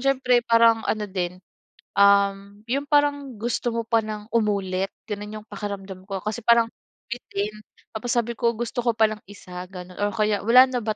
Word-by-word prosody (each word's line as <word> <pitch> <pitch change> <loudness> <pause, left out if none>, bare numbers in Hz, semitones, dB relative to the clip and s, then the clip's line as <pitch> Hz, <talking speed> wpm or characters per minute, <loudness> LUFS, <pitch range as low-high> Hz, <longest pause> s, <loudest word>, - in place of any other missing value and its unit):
siyempre 255 -2 +3
parang 230 -1 +5
ano 215 -1 0
din, 180 -2 -3 0.6
um, 200 0 +3
yung 275 +4 -2
parang 285 -4 +1
gusto 240 +2 -1
mo 230 - -1
pa 230 -1 +3
ng 215 -1 -6
umulit 195 -4 0 0.2
gano'n 210 0 -5
yung 215 - -18
pakiramdam 200 -2 -6
ko 195 -2 -3
kasi 215 +3 -3
parang 235 0 +5 0.4
bitin 210 -3 -3 0.4
tapos 230 +2 -4
sabi 235 0 +1
ko, 235 -1 +2
"gusto 240 +1 -3
ko 235 -2 +1
pa 225 - +3
nang 215 -1 -3
1" 180 -2 -9
gano'n 180 0 -10
or 205 0 +1
kaya 210 -2 +1
"wala 235 +5 +7
na 255 -2 -2
ba 215 -1 -2
215 Hz, 180 wpm, -24 LUFS, 200-235 Hz, 0.6 s, wala